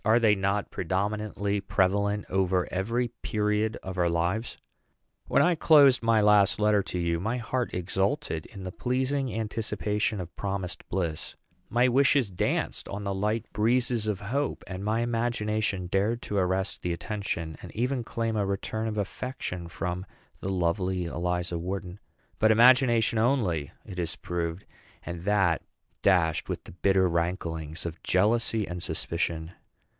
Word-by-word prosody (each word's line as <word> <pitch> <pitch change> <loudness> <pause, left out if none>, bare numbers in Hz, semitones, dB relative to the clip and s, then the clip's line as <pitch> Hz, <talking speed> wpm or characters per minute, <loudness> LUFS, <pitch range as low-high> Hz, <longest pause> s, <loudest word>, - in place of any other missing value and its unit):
Are 110 +2 +4
they 110 -3 +5
not 100 +1 0
predominantly 100 +2 -1
prevalent 100 +2 +1
over 95 -1 +1
every 115 +6 0
period 105 +1 0
of 95 -1 -5
our 85 -1 +3
lives? 85 +7 -1 0.7
When - - +4
I 180 - +4
closed 145 -5 +6
my 115 -1 +3
last 105 -2 +5
letter 105 -1 +4
to 90 - -5
you, 85 -1 0
my 110 +7 -1
heart 125 +1 -2
exulted 95 - -1
in 100 -3 -10
the 90 - -5
pleasing 130 +3 -1
anticipation 110 0 -1
of 85 -1 -7
promised 95 -2 -4
bliss; 85 -4 -2 0.3
my 120 +2 +3
wishes 135 -3 +3
danced 90 - -1
on 100 +1 -5
the 100 -1 -1
light 105 +3 -1
breezes 120 0 +1
of 105 -3 -1
hope; 135 +8 -2
and 95 +1 -6
my 110 +2 +1
imagination 110 -5 0
dared 100 +6 0
to 105 - -3
arrest 95 +1 0
the 90 - -1
attention 85 -3 -3
of, - - -14
and - - -12
even 125 +2 0
claim 115 0 -2
a 105 - +1
return 100 +3 -2
of 110 -1 -3
affection 100 -4 -4
from, 90 +3 -4 0.3
the 95 - -4
lovely 90 0 0
Eliza 90 0 -2
Wharton. 90 +1 -5 0.4
But 110 - +5
imagination 120 -1 +5
only 105 - +1 0.2
it 90 - -7
has 85 -1 -2
proved, 85 0 -3 0.4
and 85 0 -6
that 95 -5 +3 0.4
dashed 85 -5 +2
with - - -3
the - - -11
bitter 95 +1 +3
ranklings 85 -2 -2
of 80 -1 -5
jealousy 110 +2 +2
and 90 0 -5
suspicion. 85 -1 -2
100 Hz, 150 wpm, -28 LUFS, 90-115 Hz, 0.7 s, closed